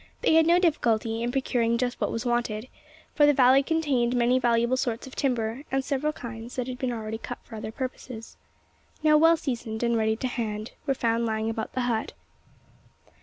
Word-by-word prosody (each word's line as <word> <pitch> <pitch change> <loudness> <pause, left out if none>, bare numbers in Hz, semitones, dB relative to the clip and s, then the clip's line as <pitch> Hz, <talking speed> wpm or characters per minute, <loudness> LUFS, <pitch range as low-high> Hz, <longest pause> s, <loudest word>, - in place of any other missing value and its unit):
They - - +3
had 320 0 +5
no 340 +1 +5
difficulty 230 - +1
in 240 +1 -1
procuring 240 -3 +1
just 245 +1 -2
what - - 0
was 230 +2 -3
wanted: 240 -1 -1 0.5
for 295 -1 +5
the 290 - +4
valley 260 +1 +6
contained 275 -6 0
many 245 +1 +3
valuable 235 0 +2
sorts 245 -2 -2
of 265 - -11
timber; 235 -2 -1
and 270 0 0
several 290 +2 0
kinds 235 -4 -8
that 250 - -2
had 255 -1 -6
been 255 -2 -1
already 220 -1 -4
cut 245 - -6
for - - -15
other 220 0 -5
purposes, 250 -2 -7 0.7
now 305 -1 +5
well 325 +2 +6
seasoned 235 -6 -4
and 235 0 +2
ready 220 -1 +1
to 255 - -3
hand, 220 -3 -4 0.2
were 275 - +2
found 230 -1 0
lying 220 0 -1
about 225 0 -5
the 255 - -1
hut. 235 -3 -1
240 Hz, 195 wpm, -26 LUFS, 225-265 Hz, 0.7 s, valley